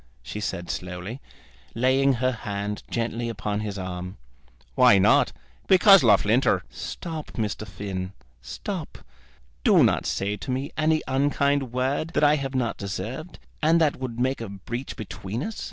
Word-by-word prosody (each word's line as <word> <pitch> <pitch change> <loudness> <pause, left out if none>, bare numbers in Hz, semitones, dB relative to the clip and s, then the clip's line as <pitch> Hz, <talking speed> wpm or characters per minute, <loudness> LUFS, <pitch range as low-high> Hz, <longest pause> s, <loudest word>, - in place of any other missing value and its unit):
she 105 - -6
said 95 -4 -3
slowly, 90 +7 -6 0.5
laying 130 +3 +3
her 130 +1 +1
hand 105 -3 -4
gently 115 0 -2
upon 105 -2 -3
his 105 -2 -4
arm. 90 0 -5 0.6
"Why 100 - +6
not? 95 - +4 0.4
Because 195 +1 +8
Loughlinter 110 +2 +3
" - - -31 0.2
"Stop, 160 -3 -6
Mr. 110 -1 -3
Finn; 95 0 -5 0.3
stop. - - -6 0.7
Do - - +6
not - - +2
say 100 +1 -1
to 115 - -8
me 130 +2 -2
any 155 0 +2
unkind 140 -1 +1
word 135 +6 -1
that - - +2
I 150 +1 +5
have 135 -1 -4
not 120 -3 0
deserved, 125 - -5 0.2
and 160 +2 +4
that 155 -3 +2
would 125 -3 -5
make 130 0 0
a 115 - -5
breach 120 +7 -6
between 110 +3 -5
us. 220 +3 -5
120 Hz, 155 wpm, -25 LUFS, 100-140 Hz, 0.7 s, Because